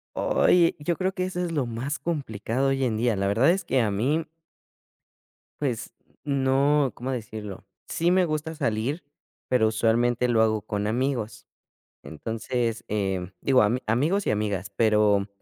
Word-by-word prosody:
Oye, 180 - +3
yo 165 +4 -1
creo 190 0 -1
que 185 -1 -2
eso 185 -1 -4
es 170 - -3
lo 145 -5 0
más 120 +5 -4
complicado 135 -5 -2
hoy 135 0 0
en 110 -3 0
día. 115 0 +1
La 100 0 0
verdad 115 +9 +3
es 190 +1 0
que 135 -7 +1
a 105 - +1
mí. 145 +11 0 1.3
Pues 120 -6 -2 0.3
no 140 0 +2
cómo 130 +2 -5
decirlo. 110 -5 -6 0.2
Sí, 170 +2 +1
me 185 0 +4
gusta 155 0 -3
salir, 140 +1 -2 0.4
pero 120 -4 +3
usualmente 120 +2 +2
lo 115 -2 +3
hago 110 -1 +1
con 105 0 -3
amigos. 120 0 -2 0.6
Entonces, 115 +6 -3
eh, 95 -3 -2
digo 130 -3 +4
ami 120 +5 +1
amigos 155 - +1
y - - +3
amigas, 100 -3 -2
pero 105 -2 +3
120 Hz, 155 wpm, -25 LUFS, 110-145 Hz, 1.3 s, me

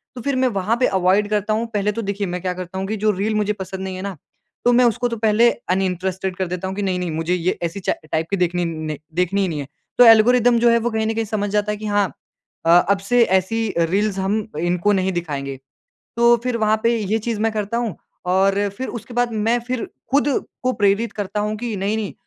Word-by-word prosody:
तो 245 - -6
फिर 280 +1 -1
मैं 260 0 +2
वहाँ 210 0 0
पे 255 - +4
अवॉइड 190 +2 +2
करता 210 0 0
हूँ। 225 +2 0
पहले 205 0 +1
तो 230 - -4
देखिए 200 -1 -2
मैं 180 0 -4
क्या 185 -1 -2
करता 185 +1 -7
हूँ 195 - -3
कि 220 - -2
जो 215 - +4
रील 210 +3 -1
मुझे 210 0 +1
पसंद 190 -1 -7
नहीं 190 -1 -4
है 185 - -6
ना 200 -2 -5 0.5
तो 245 - +6
मैं 250 0 +5
उसको 240 +1 +1
तो 230 -1 -4
पहले 220 +2 +4 0.2
अनइंटरेस्टेड 185 0 -1
कर 185 -1 -2
देता 180 +1 -4
हूँ 190 - -4
कि 205 - -3
नहीं-नहीं 180 -3 -1
मुझे 165 +3 -1
ये 180 +1 0
ऐसी 170 +4 -3
चा - - 0 0.2
टाइप 160 +1 0
की 200 - 0
देखनी 175 0 0
नहीं, 155 -2 -4 0.2
देखनी 180 +3 +1
ही 190 - +1
नहीं 155 -4 -3
है। 140 - -5 0.3
तो 245 - +8
ऐल्गोरिदम 235 +2 +6
जो 240 0 +4
है 235 - +5
वो 240 +1 -1
कहीं 220 0 0
ना 225 - 0
कहीं 225 0 -1
समझ 205 -1 -2
जाता 210 +1 0
है 210 - -3
कि 215 - -8
हाँ 205 -2 +2 0.6
अ, - - +2
अब 180 +3 +5
से 235 +5 +3
ऐसी 215 +4 +1
रील्स 195 +4 +1
हम 200 +3 0 0.2
इनको 175 +4 +1
नहीं 190 0 +1
दिखाएँगे। 140 -6 -4 0.6
तो 235 0 +6
फिर 250 -2 -1
वहाँ 215 0 +2
पे 235 0 +3
ये 215 +1 -1
चीज़ 220 -1 -3
मैं 225 0 +2
करता 215 +2 -2
हूँ 235 -6 -2 0.3
और 195 +2 +2
फिर 260 - -3
उसके 235 +1 -7
बाद 245 -1 +1
मैं 225 +3 +1
फिर 250 -2 -2 0.2
खुद 285 +1 +3 0.4
को 255 0 +1
प्रेरित 205 +3 +1
करता 205 0 -3
हूँ 210 +1 -1
कि 235 -2 -3
नहीं-नहीं 205 +2 -2
205 Hz, 245 wpm, -21 LUFS, 185-225 Hz, 0.6 s, तो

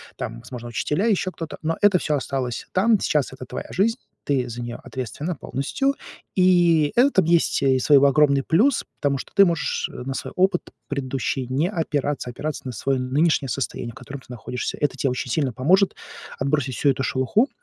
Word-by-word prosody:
там 115 -2 -5
возможно, 120 0 -8
учителя, 150 - 0
еще 195 -4 +1
кто-то, 165 -3 -7
но 165 +1 0
это 205 -2 +5
всё 155 -3 0
осталось 130 -3 -3
там. 210 +3 +3
Сейчас 150 -7 0
это 130 -1 -9
твоя - - -6
жизнь, 225 +5 +1 0.3
ты 130 -3 0
за 120 0 -6
нее 120 0 -5
ответственна 130 - -4
полностью. 270 - -1 0.4
И 175 -5 +4
это 245 -6 +4
есть 165 -3 +2
и 130 -1 +3
свой 145 +2 +5
огромный 140 0 +4
плюс, 230 - +3 0.2
потому 140 -1 +1
что - - -8
ты 200 - +8
можешь 170 -3 -1
на 130 +2 -5
свой - - -5
опыт 185 -1 +2 0.3
предыдущий 135 -2 -2
не 135 +7 0
опираться, 145 -7 -2
опираться 150 +5 -4
на - - -3
свое 135 +4 -1
нынешнее 140 +3 +1
состояние, 120 -1 -3
в - - -20
котором 135 +2 -8
ты - - -21
находишься. 125 0 -5
Это 145 - 0
те 135 - +1
очень 125 0 -3
сильно 140 -3 +1
поможет 185 - +3 0.4
отбросить 140 -2 0
всю 145 - +2
эту 135 0 +1
шелуху 135 - +1
140 Hz, 185 wpm, -23 LUFS, 130-175 Hz, 0.4 s, ты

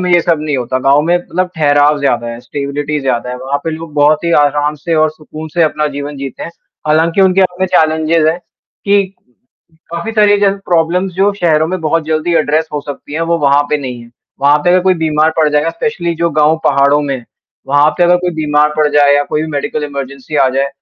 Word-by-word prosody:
में 180 0 -1
ये 175 - +5
सब 165 -2 0
नहीं 150 -2 -2
होता, 130 +1 -2
गाँव 140 +2 +3
में 175 +2 +2
मतलब 180 +1 -3
ठहराव 145 -1 +3
ज़्यादा 120 -4 0
है, 115 0 -7
स्टेबिलिटी 145 +4 -4
ज़्यादा 125 -2 -2
है। 125 - -5
वहाँ 135 +2 -2
पे 165 - -1
लोग 160 -1 -7
बहुत 150 +2 +2
ही 170 - 0
आराम 145 +1 0
से 165 +3 -3
और 155 -1 +2
सुकून 155 0 -10
से 170 - +2
अपना 150 -1 0
जीवन 145 0 -5
जीते 135 -1 -7
हैं। - - -6 0.4
हालाँकि 165 +4 +2
उनके 190 0 +3
अपने 185 0 0
चैलेंजेज़ 160 -1 +2
हैं 165 +2 -1 0.5
कि 200 0 +3 0.9
काफ़ी 170 +7 -4
सारी 210 -1 +4
जो 200 - +4 0.2
प्रॉब्लम्स 175 +3 +1
जो 195 +2 +2
शहरों 160 -5 +1
में 185 -1 -3
बहुत 160 0 0
जल्दी 160 +2 -1
एड्रेस 155 +1 +1
हो 150 - -2
सकती 145 0 -9
हैं 160 - -2
वो 170 - +1
वहाँ 140 0 +3
पे 150 - +2
नहीं 125 -4 -6
है। 120 - -16 0.3
वहाँ 145 +1 +4
पे 175 - +3
अगर 185 0 +4
कोई 185 0 +3
बीमार 155 -1 +1
पड़ 155 -2 +3
जाएगा 150 +2 +1
स्पेशली 170 -1 -3
जो 170 0 0
गाँव 155 +2 +2
पहाड़ों 140 +1 +3
में 135 -4 -4 0.4
वहाँ 145 +2 +4
पे 175 - +4
अगर 175 +1 +4
कोई 180 0 -2
बीमार 150 -1 +1
पड़ 155 - +3
जाए 145 -1 +4
या 145 - +2
कोई 150 - -2
भी 160 - -4
मेडिकल 150 +1 -3
इमरजेंसी 140 +1 -6
आ 130 - +4
जाए, 135 +2 -1
155 Hz, 225 wpm, -13 LUFS, 145-170 Hz, 0.9 s, ये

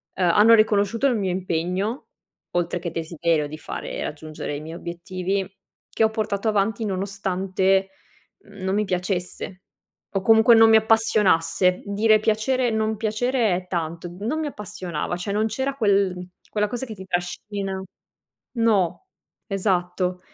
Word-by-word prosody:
uhm, 185 - -1
hanno 210 +6 +6
riconosciuto 215 +2 +3
il 250 -4 +1
mio 195 -3 -1
impegno 185 - -2 0.5
oltre 175 0 0
che 170 -1 -4
desiderio 165 -1 -1
di 155 +1 -8
fare - - -5
raggiungere 155 -1 -5
i 145 - -6
miei 160 +2 -8
obiettivi, 185 +3 -3 0.4
che - - 0
ho 220 - +3
portato 215 -1 -2
avanti 215 +1 +1
nonostante 195 0 0 0.6
non 190 -1 -3
mi 210 +1 +1
piacesse 180 0 -3 0.5
o 195 - +1
comunque 225 +4 +6
non 225 0 +7
mi 220 - +7
appassionasse. 195 -5 +3
Dire 215 +2 +3
piacere 225 +4 +1
non 220 -1 0
piacere 225 0 +1
è 180 0 -5
tanto, 170 0 -4
non 235 +10 -2
mi 315 - -2
appassionava, 200 - -4
cioè 180 +3 -4
non 215 +2 +1
c'era 265 +5 -2
quel 195 -6 +1 0.2
quella 210 -1 0
cosa 245 +4 -4
che 225 - -7
ti 190 -2 -10
trascina 190 +2 -3 0.8
no, 215 - +1 0.4
esatto. 180 -3 -1
195 Hz, 140 wpm, -23 LUFS, 180-220 Hz, 0.8 s, non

